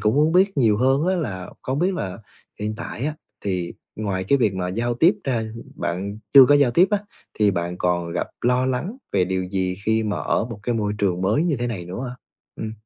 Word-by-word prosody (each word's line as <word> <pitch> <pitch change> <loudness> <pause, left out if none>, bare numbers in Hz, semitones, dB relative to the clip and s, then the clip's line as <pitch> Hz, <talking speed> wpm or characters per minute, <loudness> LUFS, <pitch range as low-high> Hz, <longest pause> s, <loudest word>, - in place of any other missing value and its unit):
cũng 105 +1 +2
muốn 150 +3 +3
biết 190 0 +3
nhiều 110 -6 +4
hơn 135 +7 +2
á 185 0 +2
là 95 - -4
không 130 +2 -2
biết 185 +3 +1
là 95 - -4 0.4
hiện 105 +1 -2
tại 120 +2 -5
á 155 - -2 0.3
thì 90 -3 -2 0.2
ngoài 100 -3 -2
cái 140 - +3
việc 105 -6 +2
mà 90 -1 -2
giao 120 +5 -1
tiếp 165 - +5
ra, 120 -5 0 0.3
bạn 100 +4 -3 0.2
chưa 135 -1 +11
có 145 - +6
giao 140 -4 +4
tiếp 175 +10 +5
á, 205 - +3 0.4
thì 105 -1 +3
bạn 85 -1 -2
còn 85 -1 0
gặp - - -2
lo 125 +1 +2
lắng 145 - -2 0.2
về 90 - +3
điều 95 0 -1
gì 95 -1 -1
khi 110 0 +2
mà 105 -1 -1
ở - - 0
một 115 -3 -8
cái 120 +1 -1
môi 105 -2 0
trường 90 -3 +1
mới 110 - +2
như 165 -6 +1
thế 120 +1 -2
này 100 -7 -4
nữa 95 +9 -5
ha? 125 - -8 0.4
Ừm. 110 0 -4
110 Hz, 235 wpm, -23 LUFS, 95-135 Hz, 0.4 s, chưa